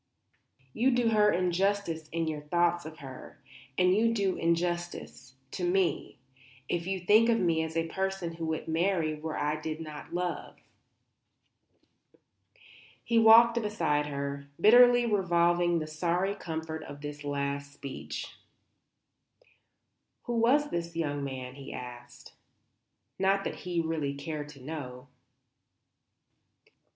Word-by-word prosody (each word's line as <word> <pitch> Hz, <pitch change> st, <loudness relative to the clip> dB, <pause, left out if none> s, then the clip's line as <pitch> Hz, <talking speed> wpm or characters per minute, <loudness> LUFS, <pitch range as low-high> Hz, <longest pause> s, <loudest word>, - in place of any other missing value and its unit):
You 245 Hz, +4 st, +2 dB
do 245 Hz, -2 st, +2 dB
her 210 Hz, -1 st, +4 dB
injustice 180 Hz, -2 st, 0 dB
in 165 Hz, 0 st, -1 dB
your 155 Hz, -1 st, -3 dB
thoughts 175 Hz, +2 st, +1 dB
of 160 Hz, 0 st, -10 dB
her; 130 Hz, -2 st, -11 dB, 0.4 s
and 180 Hz, +1 st, +4 dB
you 230 Hz, +2 st, +2 dB
do 195 Hz, -3 st, +1 dB
me -, -, -7 dB
injustice, 170 Hz, -6 st, -2 dB, 0.2 s
too, 180 Hz, -2 st, 0 dB, 0.5 s
if 175 Hz, 0 st, -2 dB
you 190 Hz, 0 st, -1 dB
think 215 Hz, +6 st, +5 dB
of 230 Hz, -1 st, +3 dB
me 165 Hz, -4 st, +2 dB
as 160 Hz, 0 st, -3 dB
a 165 Hz, 0 st, 0 dB
person 190 Hz, -1 st, -3 dB
who 165 Hz, -1 st, -5 dB
would 160 Hz, 0 st, -3 dB
marry 165 Hz, -1 st, +1 dB
where 155 Hz, +1 st, -5 dB
I 150 Hz, +1 st, -1 dB
did 155 Hz, 0 st, -4 dB
not 155 Hz, -2 st, -8 dB
love." 175 Hz, 0 st, -3 dB, 2.5 s
He 230 Hz, -1 st, +2 dB
walked 230 Hz, +1 st, +7 dB
beside 165 Hz, -9 st, 0 dB
her, 140 Hz, 0 st, -4 dB
bitterly 245 Hz, +4 st, +7 dB
revolving 175 Hz, -4 st, +2 dB
the 155 Hz, -, -2 dB
sorry 175 Hz, +5 st, -1 dB
comfort 160 Hz, -3 st, -5 dB
of 145 Hz, 0 st, -10 dB
this 145 Hz, 0 st, -7 dB
last 140 Hz, 0 st, -3 dB
speech. 140 Hz, -1 st, -7 dB, 1.9 s
"Who 240 Hz, -, -3 dB
was 280 Hz, +6 st, +3 dB
the 170 Hz, -, 0 dB, 0.2 s
young 145 Hz, -3 st, -1 dB
man?" 130 Hz, -2 st, -5 dB
he 140 Hz, 0 st, -10 dB
asked. 120 Hz, 0 st, -10 dB, 0.9 s
Not 195 Hz, +1 st, +2 dB
that -, -, -4 dB
he 175 Hz, -1 st, 0 dB
really 160 Hz, -4 st, -1 dB
cared 150 Hz, +1 st, -5 dB
to 140 Hz, -3 st, -13 dB
know. 130 Hz, -3 st, -7 dB
165 Hz, 130 wpm, -29 LUFS, 150-195 Hz, 2.5 s, walked